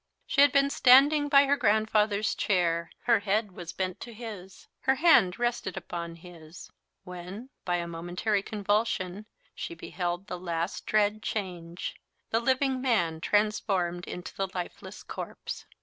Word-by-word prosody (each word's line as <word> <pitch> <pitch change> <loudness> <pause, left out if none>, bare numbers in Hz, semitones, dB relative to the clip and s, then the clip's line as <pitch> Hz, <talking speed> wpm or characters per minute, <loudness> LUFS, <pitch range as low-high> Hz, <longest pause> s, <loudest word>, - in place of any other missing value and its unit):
She 275 - +2
had 285 -1 +7
been 280 0 +3
standing 290 +3 +6
by 280 0 +7
her 280 +1 +3
grandfather's 215 -3 +2
chair 170 -4 +1
her - - +4
head 205 +1 0
was 175 -2 -8
bent 185 -1 -3
to 235 - -8
his 210 -5 -9
her 265 - +2
hand 265 - +5
rested 240 -6 -2
upon 170 -1 -5
his, 170 -1 -13 0.3
when, 185 +7 -8
by 175 - +1
a 170 -1 -2
momentary 175 +5 -1
convulsion, 205 -1 -1 0.3
she 340 - -6
beheld 175 - -4
the 180 -3 -6
last 170 0 -3
dread 215 0 +2
change 180 -5 -4 0.3
the 225 - +3
living 260 +1 +1
man 170 -11 +1
transformed 195 -4 0
into 180 - -7
the 195 - -1
lifeless 180 -1 -6
corpse. - - -7
200 Hz, 145 wpm, -28 LUFS, 175-235 Hz, 0.3 s, had